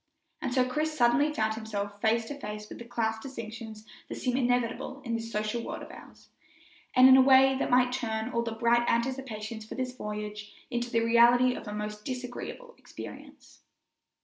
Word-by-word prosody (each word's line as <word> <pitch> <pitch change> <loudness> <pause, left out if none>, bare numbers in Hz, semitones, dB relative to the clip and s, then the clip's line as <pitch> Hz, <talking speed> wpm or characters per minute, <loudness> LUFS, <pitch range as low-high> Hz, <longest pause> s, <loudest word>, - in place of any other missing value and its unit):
And 260 - -2
so 255 0 +3
Chris 305 +4 -2
suddenly 255 +5 +4
found 220 -6 0
himself 205 -2 -5
face 225 +1 +2
to 290 - -5
face 210 -2 -6
with - - -10
the 235 - -8
class 225 -2 -1
distinctions 225 -3 -8 0.2
that - - -5
seem 250 -1 -1
inevitable 245 +1 0
in 235 - -2
this 230 0 -3
social 215 +2 -2
world - - -6
of - - -10
ours, - - -15 0.7
and 255 +1 +9
in 260 - +9
a - - +8
way 265 0 +6
that - - -1
might 250 0 +4
turn 220 0 -2
all 235 - 0
the 235 -1 -3
bright 235 +1 +2
anticipations 235 -3 -2
for 215 - -9
this 255 -1 -3
voyage 210 -2 -6 0.2
into 240 0 -2
the 230 -1 +1
reality 240 +2 +5
of 225 - -8
a - - -4
most 210 0 -5
disagreeable 255 - -6
experience. - - -11
235 Hz, 185 wpm, -29 LUFS, 220-255 Hz, 0.7 s, and